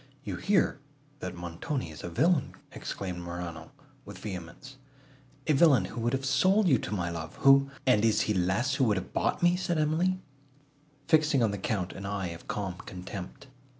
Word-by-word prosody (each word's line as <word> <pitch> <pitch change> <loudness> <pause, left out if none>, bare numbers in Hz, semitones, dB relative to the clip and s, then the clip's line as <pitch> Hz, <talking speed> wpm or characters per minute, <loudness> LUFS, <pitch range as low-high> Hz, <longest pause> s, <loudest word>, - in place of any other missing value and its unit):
"You - - -4
hear, 195 -7 +2 0.4
that - - -5
Montoni 85 - -4
is 75 - -10
a - - -4
villain," 145 - +2 0.2
exclaimed 90 -3 -5
Morano 85 -2 -6 0.3
with - - -10
vehemence,—"a 135 - -7
villain 140 -2 +5
who 120 - -6
would 120 +2 0
have 135 0 -1
sold 190 +9 +3
you 130 -8 +4
to - - -5
my 85 -4 -1
love!—Who—" 135 +12 +3 0.2
"And 125 -5 +4
is 110 -1 +3
he 105 - +1
less, 95 +9 +1
who 140 -2 +2
would 105 -4 +2
have 95 - -6
bought - - 0
me?" 175 0 +5
said 175 -2 -1
Emily, 160 +5 +1 0.9
fixing 155 -5 +4
on 110 - +2
the 100 - -4
Count 95 -2 -2
an 100 0 -6
eye 100 -3 -2
of 85 0 -10
calm 95 -3 -3
contempt. 95 +7 -8
120 Hz, 175 wpm, -29 LUFS, 90-140 Hz, 0.9 s, villain